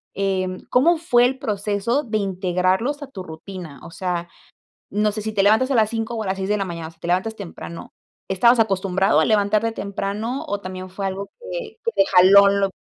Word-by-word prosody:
em, 185 -2 -1
¿cómo 330 +7 +4
fue 245 -7 +3
el 260 +1 -1
proceso 210 +3 -1
de 215 -2 -2
integrarlos 190 - 0
a - - -8
tu 200 -9 -8
rutina? 165 -2 -9
O - - -10
sea, 175 -1 -3 0.7
no 210 0 +1
sé 215 - -4
si 220 0 -3
te 195 - +3
levantas 220 +6 +4
a - - +2
las 215 -1 +3
5 225 +1 -3
o 220 - -2
a - - -6
las 190 +1 -2
6 190 +1 -3
de 210 - +2
la 195 - -1
mañana, 165 -2 -6
si 165 - -24
te - - -6
levantas 190 +5 0
temprano, 170 -3 -9 0.4
¿estabas 235 +6 +4
acostumbrado 190 -5 +2
a - - +3
levantarte 215 +1 +2
temprano 205 +5 -4
o 205 0 -2
también 185 0 -7
fue 195 +1 -4
algo 195 +1 -4
que, 480 -2 -6
que 465 - 0
te 295 - +3
jaló 195 +2 +7
lo? 200 -1 +1
200 Hz, 210 wpm, -22 LUFS, 185-225 Hz, 0.7 s, jaló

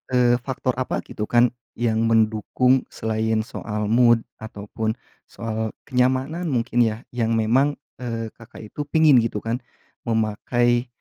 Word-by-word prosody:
eee, 120 0 +4
faktor 130 0 -2
apa, 130 - -2
gitu, 105 - -5
kan, 120 0 +4 0.2
yang 115 -1 +1
mendukung 115 +4 +2
selain 110 0 -1
soal 105 -1 -5
mood 120 -1 +5 0.2
ataupun 110 +1 -4 0.3
soal 110 -1 -4
kenyamanan 130 +6 0
mungkin, 120 -3 0
ya, 110 +2 -4
yang 115 -2 0
memang, 130 +7 +2 0.2
eee, 115 -2 -4
Kakak 115 -1 -13
itu 145 -1 -5
pingin, 155 -4 +5
gitu, 115 -2 -2
kan, 115 +2 -2 0.5
memakai, 120 +2 +1
115 Hz, 130 wpm, -23 LUFS, 110-125 Hz, 0.5 s, mood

